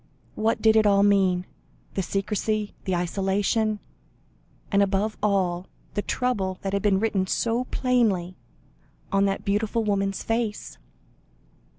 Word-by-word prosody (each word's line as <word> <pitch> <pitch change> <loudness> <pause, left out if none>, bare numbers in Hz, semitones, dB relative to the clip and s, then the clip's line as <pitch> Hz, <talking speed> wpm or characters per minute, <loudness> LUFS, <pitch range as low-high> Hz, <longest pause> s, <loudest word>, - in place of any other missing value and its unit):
What 220 +1 0
did 220 0 +5
it 215 -1 +5
all 200 0 +4
mean 190 -3 +3 0.5
the 195 - -1
secrecy, 210 +2 -1
the 190 - 0
isolation, 200 +4 0 0.9
and 200 -1 +4
above 200 +2 +1
all 190 -3 0 0.3
the 205 - 0
trouble 205 -7 -1
that 195 0 -2
had 200 - +1
been 195 -2 +3
written 200 -3 0
so 235 +5 0
plainly 220 -10 +1 0.8
on 195 -1 +3
that 195 0 -2
beautiful 210 +3 0
woman's 195 -2 -1
face? 225 -2 -2
200 Hz, 125 wpm, -25 LUFS, 195-220 Hz, 0.9 s, did